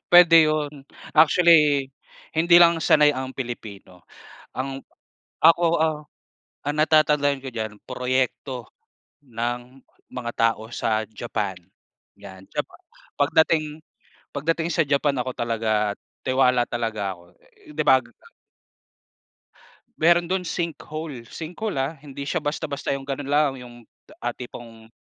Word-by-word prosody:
Pwede 175 -1 +8
yun, 150 -2 -3 0.3
actually 150 -3 +5 0.4
hindi 170 +2 +3
lang 170 -1 +5
sanay 150 -2 +5
ang 130 -1 -5
Pilipino. 105 -8 -8 0.5
Ang 135 +1 -4 0.6
ako, 165 +2 +6 0.2
ah, 155 -1 +1 0.7
ang 145 - -1
natatandaan 150 -3 +3
ko 130 - -5
diyan, 110 -2 -4
proyekto 130 -1 -2 0.6
ng 120 +2 -5 0.3
mga 120 -2 -4
tao 115 -1 0
sa 110 -2 0
Japan, 105 -3 -4 0.6
yan, 95 -2 -12
Japa - - -4 0.4
pagdating 155 +1 +2 0.5
pagdating 165 +3 -1
sa - - +1
Japan 140 0 +1
ako 130 +1 -3
talaga 110 -3 0 0.3
tiwala 125 -2 +3
talaga 110 -4 -2
ako, 85 0 -21 0.4
'di 155 +1 -1
ba? 130 -2 +4 1.9
Meron 170 +1 +4
do'n 185 0 -1
sinkhole. 160 -5 -5
Sinkhole 175 +1 -4
ah, 135 +5 -2
hindi 140 -1 -8
siya 175 -1 -2
basta-basta 145 -1 -3
yung 135 0 -4
gano'n 140 0 -4
lang, 150 -1 +3
yung, 120 -1 -12 0.4
ah, - - -3
tipong 115 -2 -11
135 Hz, 115 wpm, -23 LUFS, 120-155 Hz, 1.9 s, Pwede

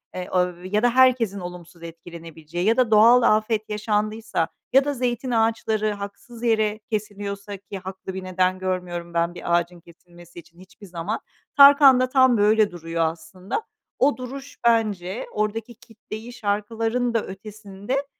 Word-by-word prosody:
eee, 180 0 -5
av 180 -1 -1
ya 210 +4 0
da 245 - +5
herkesin 245 -5 +3
olumsuz 175 -1 -10
etkilenebileceği 165 0 -7
ya 225 +2 +3
da 250 -3 +2
doğal 230 +4 +7
afet 215 -1 +1
yaşandıysa 215 -3 -1 0.3
ya 270 +1 +5
da 290 - -1
zeytin 250 0 -2
ağaçları 225 -1 +1
haksız 205 +4 -9
yere 215 -2 +1
kesiliyorsa, 205 -1 -4
ki 195 +1 -9
haklı 190 0 -8
bir 190 0 -6
neden 185 0 0
görmüyorum 180 -2 -4
ben 170 0 0
bir 170 0 -1
ağacın 175 0 -4
kesilmesi 175 0 -16
için 170 +1 -18
hiçbir 190 +2 -15
zaman, 175 +5 -4 0.4
Tarkan 280 -2 +8
da 255 - +1
tam 260 -3 +4
böyle 210 0 +3
duruyor 165 -1 -4
aslında. 170 - -5 0.4
O 280 +2 +3
duruş 270 +3 -8
bence 210 -4 0
oradaki 220 +2 -3
kitleyi 225 0 -10
şarkıların 225 +3 -1
da 230 - 0
ötesinde 210 +6 -6
210 Hz, 150 wpm, -23 LUFS, 180-230 Hz, 0.4 s, Tarkan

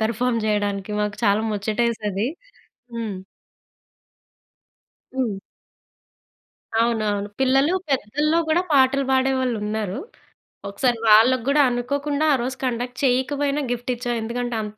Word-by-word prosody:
Perform 230 +1 0
చేయడానికి 205 -1 -1
మాకు 210 0 -2
చాలా 205 +2 +3
ముచ్చటేసేది. 215 0 -1 0.7
హ్మ్. 220 -5 -4 2.0
హ్మ్. 230 -7 -1 1.4
అవునవును. 215 -3 +1
పిల్లలు 270 +5 +3 0.2
పెద్దలో 295 +6 +1
గూడా 330 +3 +3
పాటలు 275 0 +4
పాడేవాళ్ళున్నారు. 235 -6 0 0.7
ఒకసారి 240 +4 0
వాళ్ళకి 225 +3 +6
గూడా 285 +1 +4
అనుకోకుండా, 285 +5 -1
ఆ - - +4
రోజు 255 +2 -3
కండక్ట్ 245 0 -3
చేయకపోయినా 280 +3 +1
గిఫ్ట్ 245 +1 -2
ఇచ్చాం. 245 0 -3
ఎందుకంటే 240 +1 -3
అంత 210 0 -8
240 Hz, 100 wpm, -22 LUFS, 215-265 Hz, 2.0 s, వాళ్ళకి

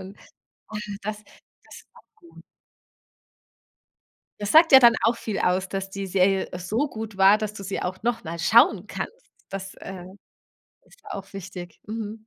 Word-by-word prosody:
und 190 +2 -11 0.5
und 210 -1 -6 0.2
das 210 0 -4 0.4
das - - -14
war - - -18
gut. 345 -6 -17 2.0
Das 205 0 -2
sagt 325 0 +7
ja 265 - +12
dann 235 -2 +7
auch 230 +1 +3
viel 215 -3 -4
aus, 185 +1 +1
dass 195 0 -4
die 195 0 -5
Serie 190 +1 +2
so 220 +11 -1
gut 220 -3 -7
war, 195 +2 +6
dass 215 -1 -4
du 200 - -8
sie 195 0 -4
auch 185 +2 -4
noch 240 0 -1
mal 170 +1 -6
schauen 210 0 +4
kannst. - - -8 0.2
Das, 195 0 -7
äh, 185 -2 -9 0.8
ist - - -22
auch 195 -1 -8
wichtig. 185 -2 -9
Mhm. 220 0 -6
200 Hz, 160 wpm, -24 LUFS, 190-225 Hz, 2.0 s, ja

